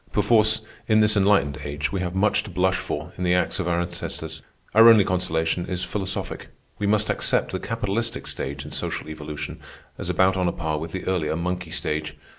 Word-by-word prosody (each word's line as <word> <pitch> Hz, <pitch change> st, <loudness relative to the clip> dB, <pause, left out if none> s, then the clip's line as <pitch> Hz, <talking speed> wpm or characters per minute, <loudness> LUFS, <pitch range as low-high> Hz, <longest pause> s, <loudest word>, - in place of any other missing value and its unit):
Perforce, 110 Hz, -1 st, +3 dB, 0.3 s
in 110 Hz, -, +4 dB
this 105 Hz, 0 st, +4 dB
enlightened 95 Hz, -8 st, +3 dB
age, 75 Hz, +1 st, -3 dB
we 95 Hz, -, -2 dB
have 90 Hz, 0 st, -3 dB
much 100 Hz, +2 st, +3 dB
to 105 Hz, -, -10 dB
blush 95 Hz, +1 st, +1 dB
for 80 Hz, +1 st, -5 dB
in -, -, -2 dB
the 90 Hz, 0 st, +3 dB
acts 90 Hz, -, 0 dB
of 90 Hz, -, -1 dB
our 85 Hz, 0 st, +1 dB
ancestors. 80 Hz, -2 st, -4 dB, 0.3 s
Our 115 Hz, +2 st, +9 dB
only 110 Hz, -3 st, +7 dB
consolation 90 Hz, -2 st, 0 dB
is 90 Hz, -1 st, -2 dB
philosophic. 95 Hz, -2 st, -3 dB, 0.3 s
We 105 Hz, -, 0 dB
must 105 Hz, 0 st, +2 dB
accept -, -, +1 dB
the -, -, -2 dB
capitalistic 115 Hz, +1 st, -2 dB
stage 70 Hz, +1 st, -4 dB
in 75 Hz, -, -9 dB
social -, -, -2 dB
evolution 75 Hz, -1 st, -6 dB, 0.4 s
as -, -, -4 dB
about 95 Hz, 0 st, +3 dB
on 90 Hz, -1 st, +1 dB
a -, -, +2 dB
par 80 Hz, -2 st, -2 dB
with 80 Hz, +1 st, -6 dB
the 95 Hz, -, -5 dB
earlier 85 Hz, -5 st, 0 dB
monkey 90 Hz, +1 st, -3 dB
stage. 75 Hz, -1 st, -2 dB
90 Hz, 200 wpm, -24 LUFS, 80-100 Hz, 0.4 s, Our